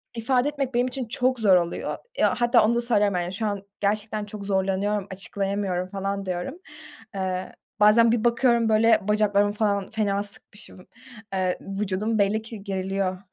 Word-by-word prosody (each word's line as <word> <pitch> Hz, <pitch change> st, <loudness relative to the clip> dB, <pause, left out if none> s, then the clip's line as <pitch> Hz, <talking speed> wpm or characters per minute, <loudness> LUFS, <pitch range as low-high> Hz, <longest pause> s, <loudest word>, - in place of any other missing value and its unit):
ifade 250 Hz, +3 st, +1 dB
etmek 275 Hz, -3 st, -3 dB
benim 245 Hz, +1 st, +2 dB
için 255 Hz, 0 st, -4 dB
çok 250 Hz, +2 st, 0 dB
zor 200 Hz, -4 st, +5 dB
oluyor. 170 Hz, -1 st, -1 dB, 0.2 s
Eee, -, -, +1 dB
hatta 240 Hz, -2 st, +4 dB
onu 235 Hz, -, +2 dB
da 240 Hz, -, +1 dB
söylüyorum, 210 Hz, -5 st, +2 dB
yani 175 Hz, +2 st, -4 dB
şu 215 Hz, +3 st, -2 dB
an 205 Hz, -2 st, -2 dB, 0.2 s
gerçekten 210 Hz, +1 st, -1 dB
çok 205 Hz, -1 st, -8 dB
zorlanıyorum, 195 Hz, +1 st, 0 dB
açıklayamıyorum, 195 Hz, -1 st, -2 dB
falan, 195 Hz, 0 st, -3 dB
diyorum. 180 Hz, -, -4 dB, 0.6 s
Iıı, 185 Hz, -1 st, -3 dB, 0.3 s
bazen 220 Hz, +2 st, +6 dB
bir 230 Hz, -2 st, 0 dB
bakıyorum, 235 Hz, -1 st, +3 dB
böyle, 225 Hz, +1 st, +4 dB
bacaklarımı 205 Hz, -1 st, +2 dB
falan 205 Hz, -2 st, 0 dB
fena 205 Hz, -3 st, -1 dB
sıkmışım, 205 Hz, -2 st, -8 dB, 0.5 s
ııı, 185 Hz, -1 st, +1 dB
vücudum 200 Hz, +2 st, -2 dB
belli 205 Hz, +2 st, +2 dB
ki 220 Hz, -2 st, -10 dB
geriliyor. 190 Hz, -1 st, -2 dB
205 Hz, 160 wpm, -25 LUFS, 195-225 Hz, 0.6 s, bazen